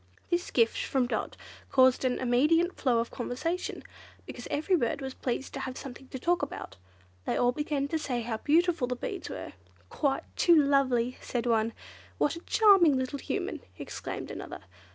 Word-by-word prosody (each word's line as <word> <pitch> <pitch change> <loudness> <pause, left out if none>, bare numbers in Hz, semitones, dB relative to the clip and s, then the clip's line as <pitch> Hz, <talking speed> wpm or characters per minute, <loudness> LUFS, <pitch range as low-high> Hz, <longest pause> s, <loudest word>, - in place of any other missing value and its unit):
This 350 +1 0
gift 230 -2 +2
from 265 -2 +1
Dot 245 - -3 0.3
caused 260 -1 +5
an 255 -1 +1
immediate 300 +8 +3
flow 250 -5 +2
of 230 0 -1
conversation, 330 +9 -3 0.4
because - - -8
every 315 +6 +1
bird 280 -3 0
was 265 -1 -5
pleased 260 +1 -3
to - - -4
have 260 -1 -5
something 265 0 -9
to 260 - -6
talk 345 +7 +1
about. 285 - -5 0.5
They - - 0
all 245 0 +3
began 285 +1 -1
to 320 - 0
say 255 -5 -2
how 230 -1 -3
beautiful 320 +1 +2
the 250 - -2
beads 390 - -5
were. - - -7 0.4
"Quite 280 -3 0
too 345 - +5
lovely!" 270 -5 +3
said 240 -1 -3
one. 225 -1 +2 0.4
"What 295 - +1
a - - -7
charming 385 -11 +5
little 260 +2 -2
Human!" - - -3 0.2
exclaimed - - -6
another. - - -7
270 Hz, 175 wpm, -29 LUFS, 245-320 Hz, 0.5 s, caused